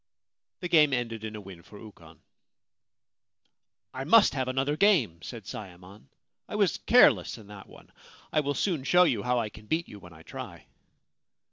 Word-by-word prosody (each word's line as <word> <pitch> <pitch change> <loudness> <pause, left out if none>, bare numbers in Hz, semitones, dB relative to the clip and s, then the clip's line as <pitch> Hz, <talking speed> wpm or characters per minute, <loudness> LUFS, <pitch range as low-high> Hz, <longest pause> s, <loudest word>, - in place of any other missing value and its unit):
The 180 - -3
game 155 -5 +4
ended 115 -3 -3
in 110 -1 -6
a 105 - -8
win 95 -3 -12
for 105 - -15
Ukon. 85 -7 -15 0.9
' 100 +1 -53
I 130 0 -5
must 210 +9 +5
have 130 -2 -2
another 135 +3 -1
game/ 155 - +2
said 115 +1 -9
Sayemon. 95 -3 -11 0.2
' - - -59
I - - -6
was - - +1
careless - - +4
in 110 - -14
that 100 -2 -12
one. - - -17 0.4
I 155 - +3
will 145 -1 -2
soon 165 -3 -1
show 180 +5 +4
you 130 - +1
how 125 +2 0
I 115 -3 -1
can 105 +1 -15
beat 165 +5 -1
you 105 - -12
when 90 -2 -14
I 80 0 -15
try.' - - -10
115 Hz, 190 wpm, -27 LUFS, 100-145 Hz, 0.9 s, must